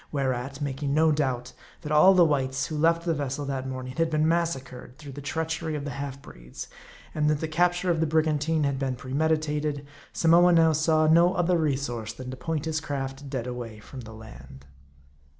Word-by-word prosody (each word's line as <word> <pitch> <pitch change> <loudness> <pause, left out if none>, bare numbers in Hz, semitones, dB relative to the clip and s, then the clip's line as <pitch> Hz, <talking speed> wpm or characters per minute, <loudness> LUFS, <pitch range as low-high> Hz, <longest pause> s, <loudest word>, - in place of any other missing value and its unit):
Whereat, 135 0 -2
making 140 0 -2
no 160 0 +4
doubt, 130 -4 -1 0.3
that 150 -3 -6
all 170 +6 +6
the 175 -2 +6
whites 135 -3 0
who 155 - -5
left 165 +2 +2
the 170 - +1
vessel 145 -1 -3
that 135 -1 -3
morning 130 -1 -6
had 165 0 +2
been 155 0 +1
massacred 135 -7 -2
through 145 -2 -10
the 145 +2 -8
treachery 160 +2 -3
of 145 -1 -4
the 145 - -4
half 140 -1 -5
breeds; - - -10 0.5
and 150 0 +1
that 150 -1 +1
the 160 - -2
capture 175 +3 +1
of 165 - 0
the 160 - +1
brigantine 155 0 +1
had 140 -2 0
been 135 -2 -1
premeditated; 150 +2 -1 0.3
Samoa 175 +2 +5
now 165 -1 +5
saw 155 +1 +2
no 170 +3 +5
other 175 +1 +2
resource 130 -7 -2
than 125 +2 -8
to - - -6
point 160 +2 -3
his 160 0 -1
craft 140 -2 -5
dead 130 -4 -3
away 120 -3 -6
from 130 +5 -11
the 110 -2 -9
land. 110 -11 -13
145 Hz, 195 wpm, -26 LUFS, 130-160 Hz, 0.5 s, all